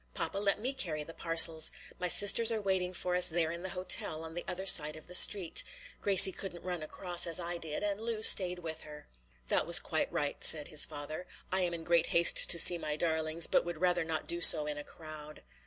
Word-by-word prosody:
"Papa, 195 - -5
let 200 0 -3
me 255 +5 -6
carry 155 - -5
the 165 - -13
parcels. 165 -1 +3 0.3
My 180 - -5
sisters 205 +5 +5
are 225 - -5
waiting 190 -3 -5
for 180 0 -6
us 180 - +7
there 160 -1 -3
in 170 0 -10
the 190 - -7
hotel 165 -3 0
on 160 0 -10
the 175 - -9
other 190 +2 -7
side 155 -5 +2
of 155 - -16
the 180 - -13
street. 180 -2 +3 0.4
Gracie 195 -1 +5
couldn't 180 -2 -10
run 180 -2 -7
across 175 +3 -2
as 170 +1 +2
I 175 0 -5
did, 160 +3 -8
and 205 0 -5
Lu 225 -1 -8
stayed 180 -4 +3
with 160 -2 -9
her." 150 -1 -16 0.4
"That - - -2
was - - +2
quite - - -6
right," 145 -1 -7
said 150 -2 +2
his 150 - +2
father. 155 +3 -11 0.2
"I 190 +1 +1
am 175 -1 -4
in 165 - -12
great 170 0 -2
haste 170 0 +3
to 170 - +4
see 175 0 +4
my 150 -2 -7
darlings, 160 0 -2
but - - -2
would 175 -2 -10
rather 180 -1 -3
not 160 -1 -6
do 170 0 -3
so 155 -3 +7
in 150 -1 -7
a - - -10
crowd." 155 -1 -14
170 Hz, 230 wpm, -28 LUFS, 160-185 Hz, 0.4 s, us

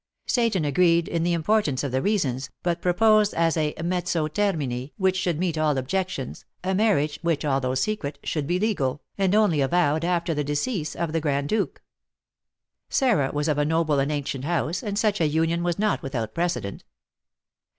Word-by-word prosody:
Seyton 230 - +1
agreed 170 +3 +3
in 170 - -1
the 175 +1 +1
importance 165 -5 +1
of 140 - -2
the 130 +1 0
reasons, 135 - 0
but 175 -1 -1
proposed, 210 +3 +3
as 165 -1 +2
a 155 -2 0
mezzo 175 -2 0
termini 150 -8 -2
which 190 -1 +2
should 180 -4 0
meet 170 -2 -1
all 150 -3 +2
objections, 165 +1 -3 0.2
a 190 +1 0
marriage, 185 -8 +1
which, 165 -3 0
although 135 -2 0
secret, 145 -2 -2
should 150 -3 -2
be 175 +2 +1
legal, 150 - -1
and 195 0 +1
only 205 -9 +3
avowed 155 +1 +2
after 170 -1 0
the 150 -1 -1
decease 150 - -2
of 170 -2 -2
the 165 - 0
Grand 140 -1 -1
Duke. 215 -2 -1 1.1
Sarah 215 - +2
was 150 +1 -1
of 150 -2 +1
a - - +3
noble 160 -2 +1
and 140 +2 0
ancient 140 -2 -3
house, 165 +1 -1
and 205 -4 -3
such 210 -3 +1
a 160 - +4
union 165 +3 +1
was 175 -1 -1
not 210 0 +1
without 125 -5 -4
precedent. 170 - -2
165 Hz, 180 wpm, -25 LUFS, 145-185 Hz, 1.1 s, a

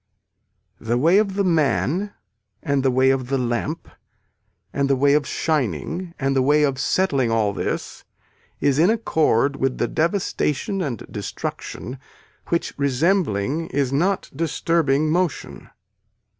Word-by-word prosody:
The 120 +2 -1
way 165 +9 +4
of 200 -3 0
the 200 - +1
man 170 +3 +1 0.5
and 140 -1 +1
the 135 - +2
way 130 +1 +3
of 130 -2 -1
the 135 +1 0
lamp 125 +6 -2 0.9
and 140 -1 0
the 135 - +4
way 140 +2 +3
of 145 -2 +2
shining 160 - -2
and 135 -1 0
the 135 - +3
way 150 +3 +3
of 135 -3 0
settling 140 -6 +1
all 110 -3 +1
this - - -4 0.6
is 140 0 +2
in 170 +5 +5
accord 150 - +1
with 135 -1 -1
the - - 0
devastation 170 +1 -1
and 130 - -4
destruction 130 +2 -6 0.5
which 170 - -1
resembling 140 - 0
is 135 -1 -1
not 185 +7 0
disturbing 155 -1 +1
motion. 175 -2 -2
145 Hz, 135 wpm, -22 LUFS, 130-170 Hz, 0.9 s, in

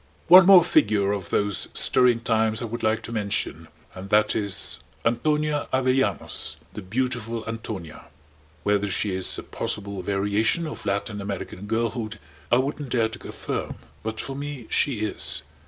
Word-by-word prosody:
One 180 +1 +10
more 190 -3 +9
figure 105 - +3
of 100 -4 -3
those 105 -2 0
stirring 125 -2 +3
times 110 0 +1
I - - -1
would 115 +1 -5
like 110 +1 +1
to - - -7
mention: 100 -7 -2 0.3
and 95 +1 -9
that 105 0 +3
is 100 -2 -1 0.3
Antonia 150 +5 +1
Avellanos 130 -5 0 0.2
the - - -6
"beautiful 115 +2 -2
Antonia." 110 -8 -6 0.6
Whether 105 0 +1
she 100 +1 -1
is 95 0 +2
a - - -6
possible 100 -2 -4
variation 100 - +1
of 155 - -7
Latin 100 +1 -2
American 100 0 -6
girlhood 115 0 -2 0.3
I 120 - +6
wouldn't 140 +1 -2
dare 115 -2 +2
to 110 - -9
affirm. - - -4 0.3
But, 110 0 -4
for 135 - -4
me, 140 -3 -6
she 125 -7 +1
is. 110 - -1
110 Hz, 155 wpm, -25 LUFS, 100-125 Hz, 0.6 s, One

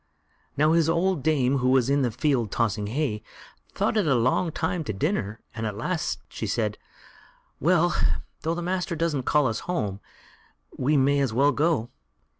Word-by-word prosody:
Now, 155 +2 +4
his 165 -1 +3
old 170 -1 +1
dame, 135 -2 +2
who 125 0 +1
was 130 -2 +4
in 140 +1 +2
the 125 - +2
field 125 -1 0
tossing 105 -3 0
hay, 115 -3 -1 0.5
thought - - +1
it 200 -6 +2
a 135 - +4
long 130 +8 +1
time 160 +1 -2
to 110 - -3
dinner, 110 - -2
and 110 -1 -3
at 105 -1 -5
last 165 +9 -2
she - - -5
said: - - -1 0.8
"Well! 175 -1 +3 0.5
though 165 +2 -1
the 175 - -4
master 180 0 -2
doesn't 155 -5 -1
call 150 -2 +4
us 115 -3 0
home, 105 - -1 0.8
we 145 +4 +1
may 140 +1 +3
as 135 -5 0
well 140 +5 +4
go. 145 -6 0
140 Hz, 175 wpm, -25 LUFS, 120-165 Hz, 0.8 s, Now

